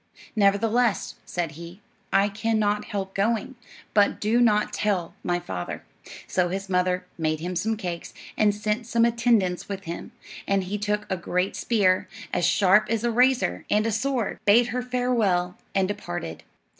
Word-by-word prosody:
"Nevertheless," 215 +3 +2
said 170 -3 -2
he, 170 +4 -10 0.3
"I 200 +1 +4
can 220 +2 -1
not 210 0 +1
help 195 -1 -4
going; 220 +5 0 0.4
but 205 -1 +3
do 225 +3 +2
not 210 -3 +3
tell 195 -5 -1
my 175 0 0
father." 95 - -5 0.4
So 180 -1 0
his 195 +2 -4
mother 180 0 +1
made 155 -1 0
him 180 +3 -4
some 220 +5 0
cakes, 175 -5 -5 0.2
and 210 -1 +3
sent 210 +2 -2
some 230 0 +3
attendants 230 -7 +1
with 195 -1 -5
him; 170 -1 -6 0.4
and 195 -1 +2
he 200 +3 -4
took 210 0 -1
a 190 - 0
great 180 +2 -1
spear, 195 -5 +2 0.3
as 175 -1 +1
sharp 190 +4 +4
as 230 0 0
a 240 - +1
razor, 245 - +2
and 210 +1 +2
a 225 - +1
sword, 240 0 -1
bade 235 +4 +5
her 250 +2 -1
farewell, 235 -8 0 0.2
and 190 -1 +3
departed. 85 - -5
205 Hz, 165 wpm, -25 LUFS, 180-225 Hz, 0.4 s, bade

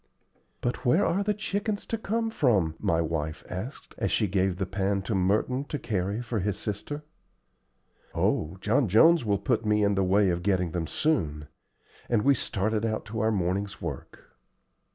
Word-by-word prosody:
"But 120 - -2
where 160 +11 +4
are 185 +4 +1
the 210 +1 0
chickens 205 0 -2
to - - -2
come 225 +1 -1
from?" 105 - +2
my 80 0 +1
wife 80 -1 -3
asked, 105 +10 -7
as - - 0
she 110 - +2
gave 95 -1 +1
the 95 +1 -2
pan 100 +1 -1
to 110 - -2
Merton 105 +8 +1
to 150 - -4
carry 100 -1 -2
for 115 -2 -2
his 100 0 -1
sister. 145 +8 -4 1.1
"Oh, 80 +5 0
John 120 +4 +2
Jones 160 - +6
will 100 -2 +2
put 110 +3 0
me 105 -1 +2
in 100 0 +3
the 95 -1 +1
way 95 +1 +3
of 85 0 -2
getting 90 -3 +1
them 80 -1 -2
soon;" 75 - -1 0.6
and 115 -3 +2
we 140 - +5
started 110 -2 -1
out 110 -1 -1
to 110 +1 -5
our 110 +1 +2
morning's 100 0 -1
work. 75 -7 -8
105 Hz, 175 wpm, -27 LUFS, 95-125 Hz, 1.1 s, Jones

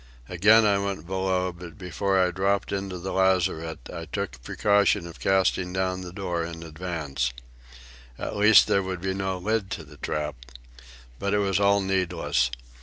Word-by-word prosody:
Again 105 +5 +5
I 100 -1 +3
went 100 -5 -3
below; 95 0 0
but 85 +2 -11
before 95 +1 0
I 90 -1 +3
dropped 95 +2 0
into 95 -2 -3
the 95 +2 -5
lazarette 85 -6 +1
I 85 - -6
took 100 +4 -3
the - - -14
precaution 100 +7 +2
of 85 -1 -10
casting 95 -1 +1
down 95 0 -1
the 90 -1 -7
door 90 -3 -3
in 85 0 -7
advance. 75 -6 -3 0.9
At - - -4
least 105 +1 +7
there 100 - +2
would 95 -2 -4
be 95 0 -1
no 95 -1 -2
lid 105 +1 -1
to 80 - -9
the 75 0 -15
trap. 75 -2 -3 0.8
But 100 +1 0
it - - +3
was 100 -1 +1
all 100 0 +4
needless. 90 -9 0
95 Hz, 175 wpm, -26 LUFS, 85-100 Hz, 0.9 s, least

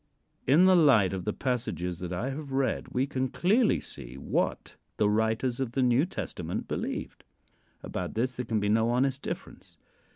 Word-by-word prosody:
In 155 +8 +6
the 185 0 +6
light 130 - +5
of 90 -2 -4
the - - +1
passages 90 - -2
that 90 -1 -5
I 115 +10 -2
have 140 -1 -6
read 135 -1 0
we 130 +2 0
can 130 -2 -1
clearly 210 - +2
see - - -8
what - - -2 0.2
the 105 - +3
writers 110 +4 +1
of 130 -3 -2
the 130 - +2
New 125 +6 +3
Testament 90 - -5
believed. - - -4 0.6
About 90 -1 -4
this 125 +3 0
there 125 - -3
can 110 -1 +1
be 105 - -1
no 110 +2 +3
honest 130 +3 +1
difference. - - -7
125 Hz, 175 wpm, -28 LUFS, 105-135 Hz, 0.6 s, In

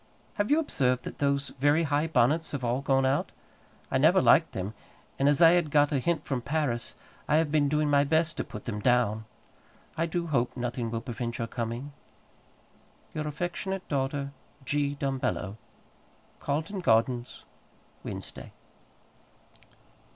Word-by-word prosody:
Have 205 +2 0
you 295 - +5
observed 125 - +1
that - - -8
those 140 0 +1
very 145 +4 +4
high 150 +1 +1
bonnets 160 +2 +2
have 140 -3 -3
all 120 +2 0
gone 135 -1 +2
out: 135 +2 +1 0.6
I - - +2
never - - +5
liked - - +5
them; 95 +3 -4 0.5
and 140 +1 +4
as 145 +4 +4
I 165 - +9
had 175 -3 +2
got 145 0 +3
a 140 - +1
hint 160 +2 -1
from 130 -3 -2
Paris, 135 -3 -2 0.3
I 150 - +3
have 160 -1 +2
been 150 -2 +3
doing 150 +1 +1
my 145 -1 +4
best 160 +2 +1
to - - -1
put 105 - -9
them 105 -3 -3
down. 110 -2 +2 0.7
I 165 +1 0
do 170 +1 -2
hope 135 -6 0
nothing 120 -1 -2
will 115 0 -3
prevent 120 -1 -4
your 115 - -2
coming. 120 +4 -5 1.2
Your 155 0 -3
affectionate 175 +5 -3
daughter, 140 0 -1 0.3
G. 145 +1 0
DUMBELLO. 130 -7 -2 0.8
Carlton 160 +7 -2
Gardens, 120 -3 +1 0.6
Wednesday. - - -7
140 Hz, 150 wpm, -28 LUFS, 125-155 Hz, 1.2 s, I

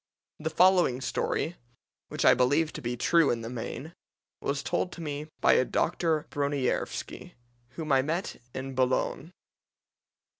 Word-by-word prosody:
The 160 +1 -2
following 175 -6 +4
story, 160 +5 -2 0.5
which - - -2
I - - +8
believe 145 +6 +2
to - - -6
be 120 0 -3
true 165 +5 +4
in 115 - 0
the 115 +1 -6
main, 130 +6 -6 0.5
was 140 0 -2
told 180 - -2
me 150 -2 -5
by - - +6
a - - +4
Dr. 160 +2 0
Broniervski, 140 -2 -2 0.4
whom 155 -3 -4
I 135 -1 +5
met 165 +4 -3
in 135 +1 -5
Boulogne. 130 +5 0
145 Hz, 140 wpm, -28 LUFS, 130-165 Hz, 0.5 s, I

